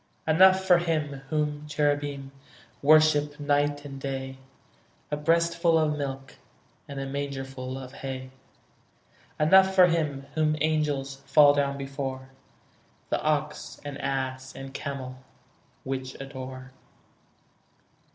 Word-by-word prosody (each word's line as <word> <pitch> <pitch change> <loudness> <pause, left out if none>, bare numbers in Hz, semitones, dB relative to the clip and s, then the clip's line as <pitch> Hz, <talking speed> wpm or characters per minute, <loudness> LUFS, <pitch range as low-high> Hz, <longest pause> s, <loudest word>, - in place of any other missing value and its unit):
Enough 190 +4 +6
for 180 -2 +6
Him 155 -5 -2
whom 150 -1 -1
cherubim 145 -2 -1 0.5
Worship 150 0 +4
night 145 0 0
and 135 -1 -8
day, 135 -1 -5 0.7
A - - +1
breastful 170 +2 +2
of 155 -1 +1
milk 135 -2 -5 0.5
And 140 -1 -6
a 135 - -3
mangerful 135 -2 -5
of 130 -1 -9
hay; 130 -1 -6 1.1
Enough 190 +5 +5
for 185 -1 +8
Him 150 -5 -1
whom 155 0 +2
angels 145 -3 0
Fall 145 +1 +7
down 140 -1 0
before, 135 -1 -5 0.8
The - - +1
ox 150 -1 -2
and 145 -1 -5
ass 130 -1 -3
and 135 0 -8
camel 130 -3 -6 0.6
Which 130 -1 -5
adore. 130 -1 -8
145 Hz, 110 wpm, -27 LUFS, 135-155 Hz, 1.1 s, for